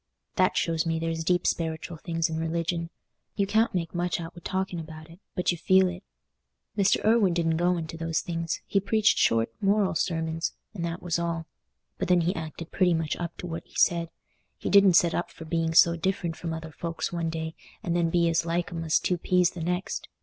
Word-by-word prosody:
That 185 -1 +2
shows 165 -2 +1
me 165 -1 -1
there's 165 0 -2
deep 175 +1 +2
speritial 160 0 -2
things 165 -2 0
in 160 -1 -3
religion. 165 +1 -1 0.5
You 200 - +1
can't 220 +1 +2
make 165 -2 -2
much 175 0 -1
out 165 -1 -7
wi' 175 - -11
talking 190 -2 -2
about 155 0 -9
it, 170 - -15 0.2
but 180 - +1
you 175 - -4
feel 190 +2 +5
it. 180 +1 -7 0.7
Mr. 200 0 +2
Irwine 215 -5 +4
didn't 165 -2 +1
go 175 +1 +2
into 165 0 -5
those 165 0 -1
things—he 165 +3 -2
preached 215 +2 +2
short 115 0 +3
moral 200 -1 +2
sermons, 160 -1 -1 0.2
and 180 -5 -5
that 170 +1 -4
was 170 -1 0
all. 170 -1 -2 0.5
But - - -1
then 180 -1 +4
he 170 +3 +1
acted 160 0 -6
pretty 180 -3 +3
much 160 -2 -1
up 170 -1 -5
to - - -6
what 165 -1 -5
he - - -22
said; 170 -1 +3 0.5
he - - -3
didn't 200 -2 +7
set 170 -1 +5
up 175 - -1
for 160 - -11
being 165 0 -1
so 170 0 +7
different 170 -1 -1
from 165 0 -5
other 160 0 -6
folks 165 +2 -4
one 170 -1 -1
day, 160 0 -4 0.3
and 170 - -1
then 170 -1 +2
be 170 0 +3
as 165 0 +2
like 170 +1 -1
'em 165 -1 -4
as 160 -1 +3
two 180 -2 0
peas 180 0 +3
the 175 - -7
next. 180 +3 -2
170 Hz, 215 wpm, -27 LUFS, 165-180 Hz, 0.7 s, didn't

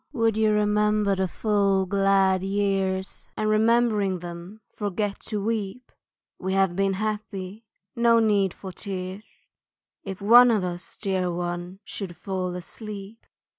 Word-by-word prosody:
Would 230 -4 +2
you 220 0 +3
remember 210 -1 +2
the 190 0 0
full 200 -1 +1
glad 195 -1 +3
years, 195 -1 -1
And 215 - 0
remembering 215 -3 +3
them 175 +4 -9
forget 205 0 -3
to 210 - -2
weep? 225 +2 -3 0.5
We 190 0 -2
have 190 -2 +2
been 195 0 +1
happy, 210 0 -4 0.3
no 235 0 +4
need 205 -4 +3
for 190 +1 -9
tears 190 +1 -7 0.6
If 195 -2 -6
one 240 +4 +7
of 215 -5 +2
us, 175 -1 -6
dear 185 -3 -1
one, 175 +2 -4
should 185 -4 -5
fall 185 -1 -3
asleep. 205 +3 -9
195 Hz, 135 wpm, -25 LUFS, 190-215 Hz, 0.6 s, one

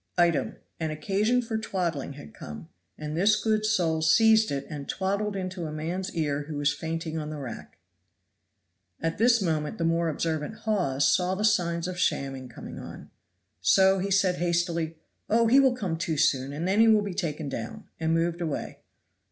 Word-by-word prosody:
Item. 175 -2 +2 0.2
An 160 -1 -1
occasion 210 +9 +1
for 225 -1 -2
twaddling 170 -10 -2
had 145 +1 -12
come, 165 - -9 0.3
and 150 0 -5
this 200 +5 +3
good 215 -1 +1
soul 170 -7 +1
seized 220 +7 +5
it 140 -1 -3
and 145 -3 -7
twaddled 200 +2 -1
into 185 -3 -4
a - - -6
man's 170 +5 -4
ear 145 -3 -1
who 155 -2 -5
was 145 0 +2
fainting 160 +1 -4
on 150 -1 -5
the 155 - -5
rack. 130 -6 -8 1.2
At 165 +2 -2
this 235 -2 +4
moment 155 +2 -1
the 170 - -2
more 165 0 +1
observant 160 +4 -2
Hawes 175 -11 +1
saw 180 +4 +2
the 210 +2 0
signs 175 -5 +1
of 180 -1 -5
shamming 135 -6 -1
coming 120 - -9
on. - - -10 0.5
So 190 0 +5
he 195 +2 -2
said 190 -2 +2
hastily, 170 -2 -1 0.3
"Oh, 230 +2 +4
he 250 +5 +6
will 265 -2 +4
come 195 -9 -2
to 160 -1 -2
soon, 135 -1 +2
and 155 +5 -3
then 195 +3 +2
he 225 - +7
will 215 -2 +5
be 200 -2 -4
taken 160 -3 -3
down;" 115 -4 -6
and 160 0 0
moved 170 +1 0
away. 160 -4 -4
170 Hz, 185 wpm, -27 LUFS, 155-200 Hz, 1.2 s, he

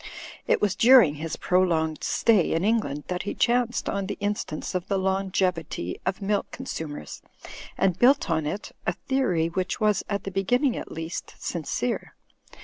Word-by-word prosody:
It - - +2
was 205 -2 +1
during 235 - +7
his 165 -1 -3
prolonged 165 -4 +1
stay 215 -7 +3
in 165 - 0
England 210 -10 0
that 180 0 -2
he 205 - -4
chanced 240 0 +1
on 200 -1 -2
the 205 - -4
instance 205 -6 -3
of 180 -1 -2
the 200 - 0
long 190 0 0
evity 165 - -1
of 190 +2 -1
milk 205 +1 0
consumers, 145 - -6 0.6
and 185 -2 +1
built 270 +3 +5
on 160 -3 0
it 200 +7 -4 0.2
a - - +2
theory 255 -12 0
which 180 +2 -2
was, 210 -3 +2
at 200 -1 -2
the 195 - -5
beginning 245 +8 +1
at - - -6
least, 165 +1 -6
sincere.' - - -3
190 Hz, 165 wpm, -26 LUFS, 165-210 Hz, 0.6 s, during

